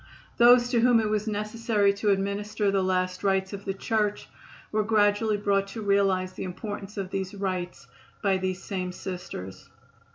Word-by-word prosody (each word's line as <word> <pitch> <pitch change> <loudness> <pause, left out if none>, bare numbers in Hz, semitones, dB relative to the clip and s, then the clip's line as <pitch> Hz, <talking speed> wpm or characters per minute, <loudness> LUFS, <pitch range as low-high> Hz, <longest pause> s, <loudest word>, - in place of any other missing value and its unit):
Those 240 +1 +7
to 245 -2 +2
whom 240 0 +5
it 215 -1 0
was 215 0 -1
necessary 210 -1 +1
to 205 +1 -1
administer 200 +1 0
the 195 -1 +2
last 185 0 -1
rites 190 0 +1
of 200 0 -7
the 195 - -1
Church 210 0 -1 0.4
were 215 - +2
gradually 210 0 +2
brought 200 -1 +1
to 220 +2 -6
realize 195 -2 +2
the - - -6
importance 205 +2 -6
of 195 -1 -4
these 190 0 -3
rites 185 -5 -4 0.4
by 195 -2 +3
these 185 0 -3
same 185 -2 -3
Sisters. 180 - -7
200 Hz, 165 wpm, -27 LUFS, 190-210 Hz, 0.4 s, Those